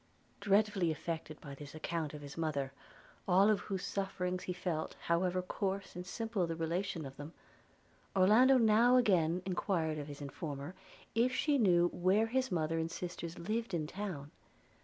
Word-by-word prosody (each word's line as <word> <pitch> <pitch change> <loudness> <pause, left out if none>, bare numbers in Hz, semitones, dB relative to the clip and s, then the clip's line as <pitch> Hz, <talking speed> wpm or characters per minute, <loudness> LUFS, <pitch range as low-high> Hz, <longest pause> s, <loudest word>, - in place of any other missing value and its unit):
Dreadfully 200 -3 +2
affected 160 0 -4
by 140 - -9
this 145 +2 -10
account 155 -1 -3
of 145 - -9
his 140 0 -9
mother, 145 -5 -1 0.6
all 195 +3 +5
of 210 - +2
whose 195 -2 -4
sufferings 185 -2 -2
he - - -2
felt, 175 -3 -3
however 180 +2 +1
coarse 195 +1 -3
and 180 +1 -6
simple 220 -4 -1
the 165 - -3
relation 165 0 -2
of 135 0 -9
them, 145 +3 -8 0.8
Orlando 220 +8 +6
now 230 +2 +5
again 180 -7 +3
enquired 170 -4 -1
of 145 - -6
his 145 -1 -8
informer, 145 +2 -6 0.4
if 245 +3 +2
she 290 -3 +2
knew 175 -5 +4
where 190 +6 +2
his 260 +2 0
mother 165 -1 0
and 160 0 -1
sisters 170 -1 -6
lived 215 +2 -2
in 155 -2 -1
town? 165 -5 -5
180 Hz, 160 wpm, -34 LUFS, 160-200 Hz, 0.8 s, Orlando